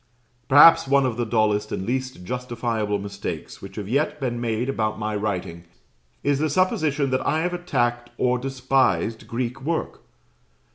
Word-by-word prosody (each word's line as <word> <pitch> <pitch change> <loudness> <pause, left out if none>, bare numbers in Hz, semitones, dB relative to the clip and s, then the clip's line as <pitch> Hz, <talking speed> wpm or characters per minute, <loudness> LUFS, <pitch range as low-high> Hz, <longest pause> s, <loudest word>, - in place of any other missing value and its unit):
Perhaps 145 +2 +8
one 140 0 +4
of 125 -3 -1
the 120 0 -2
dullest 105 -2 +1
and 95 - -3
least 130 -4 -3
justifiable 115 -2 -2
mistakes 100 -5 -6
which 95 0 -10
have 105 -3 -5
yet 140 +6 0
been 120 -3 -2
made 115 +1 -1
about 110 -5 -1
my 110 0 -3
writing, 90 -5 -3 0.6
is 140 -1 +1
the 155 +1 +1
supposition 150 -5 +1
that 130 - +1
I 155 +2 +1
have 180 +1 -1
attacked 120 -9 -1
or 125 0 +1
despised 130 -3 0
Greek 125 +2 -3
work. 160 +4 -3
120 Hz, 155 wpm, -23 LUFS, 110-135 Hz, 0.6 s, Perhaps